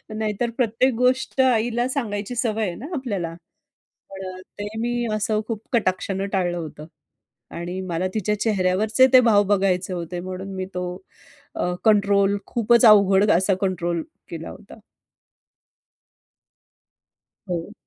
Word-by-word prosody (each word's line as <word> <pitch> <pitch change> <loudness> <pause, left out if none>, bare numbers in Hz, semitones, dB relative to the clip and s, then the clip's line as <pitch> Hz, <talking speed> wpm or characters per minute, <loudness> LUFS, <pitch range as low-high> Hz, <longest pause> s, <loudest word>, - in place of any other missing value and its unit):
नाहीतर 220 +2 -1
प्रत्येक 250 +2 +2
गोष्ट 255 +2 +1
आईला 240 -1 +2
सांगायची 215 -4 -3
सवय 225 -2 0
आहे 175 - -4
ना 250 - -9
आपल्याला. 200 - -3 0.8
पण 185 -1 -8 0.2
ते 205 - -3
मी 240 +1 -1
असं 215 0 0
खूप 225 -3 -4
कटाक्षान 195 -3 0
टाळलं 175 -2 0
होतं. 155 -2 -7 0.7
आणि 175 +2 -5
मला 170 +3 0
तिच्या 210 -1 -1
चेहऱ्यावरचे 215 +4 +3
ते 255 - +10
भाव 205 -2 +5
बघायचे 185 -1 0
होते. 175 0 -5
म्हणून 185 +2 -6
मी 185 0 -3
तो 180 0 -3 0.7
अ, 180 - -1
कंट्रोल 200 -1 +3
खूपचं 235 0 +4
अवघड 200 0 +6
असा 190 +3 +3
कंट्रोल 175 -3 -1 0.3
केला 165 -1 -6
होता. 210 - -13 2.7
हो. 175 +4 -4
205 Hz, 125 wpm, -23 LUFS, 185-225 Hz, 2.7 s, ते